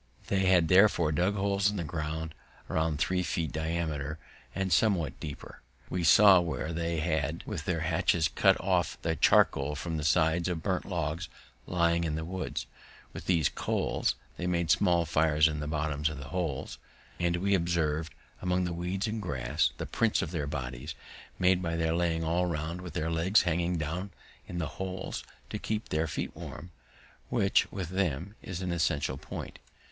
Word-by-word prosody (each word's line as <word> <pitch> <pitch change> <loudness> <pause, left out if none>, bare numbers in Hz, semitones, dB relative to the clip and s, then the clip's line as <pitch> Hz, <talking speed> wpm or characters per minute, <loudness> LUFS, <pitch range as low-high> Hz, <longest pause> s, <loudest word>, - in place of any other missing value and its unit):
They 95 -1 +2
had 90 -3 +5
therefore 90 -4 +5
dug 90 +7 +1
holes 100 0 +2
in 105 - -3
the 85 - -1
ground 80 0 -4 0.3
about 80 -1 0
three 90 +5 +1
feet 85 -4 -2
diameter, 80 -2 -2 0.4
and 95 -2 0
somewhat 90 - +2
deeper; 75 -3 -8 0.3
we 90 -1 -1
saw 100 +1 +8
where 85 -1 -2
they 85 0 -1
had 80 0 -1
with 85 -8 -5
their 85 -3 0
hatchets 80 0 +2
cut - - +3
off - - 0
the 80 0 0
charcoal 70 0 +4
from 80 +2 -3
the 75 - -3
sides 80 +2 +3
of 85 -3 -2
burnt 95 -2 -1
logs 85 -1 -2 0.4
lying 85 -1 +2
in 80 -2 -1
the 80 0 -3
woods. 90 -7 -4 0.5
With - - -8
these 85 -5 +3
coals - - -1 0.2
they 90 - -3
had - - 0
made 85 -2 +1
small 85 -3 +3
fires 80 -1 +3
in 75 -1 -2
the 75 - -3
bottom 75 -1 -1
of 75 0 0
the 70 0 -8
holes, 85 -6 -3 0.4
and 85 -1 +1
we 100 +3 +1
observ'd 80 -3 0 0.3
among 90 0 +1
the 90 -1 -2
weeds 90 +3 -2
and 110 0 -2
grass 70 -4 0
the - - -4
prints - - +1
of - - -4
their 75 -5 -2
bodies, 70 +1 -5 0.4
made 90 0 +3
by 85 -2 -1
their 80 -1 +1
laying 85 -1 +1
all 85 +3 +1
round, 85 +2 -3
with 90 -3 -8
their 80 +1 -1
legs 85 +6 +4
hanging 85 0 0
down 80 +5 -3 0.4
in 90 - -6
the 85 - -1 0.2
holes 95 0 -4 0.3
to 105 - -3
keep 110 +1 -3
their 80 +1 0
feet - - -4
warm, 80 +1 -8 0.6
which, - - +2
with 95 -4 -4
them, 95 -1 -1
is 95 0 -5
an 90 - -2
essential 75 -5 0
point. - - -7
85 Hz, 180 wpm, -30 LUFS, 80-90 Hz, 0.6 s, saw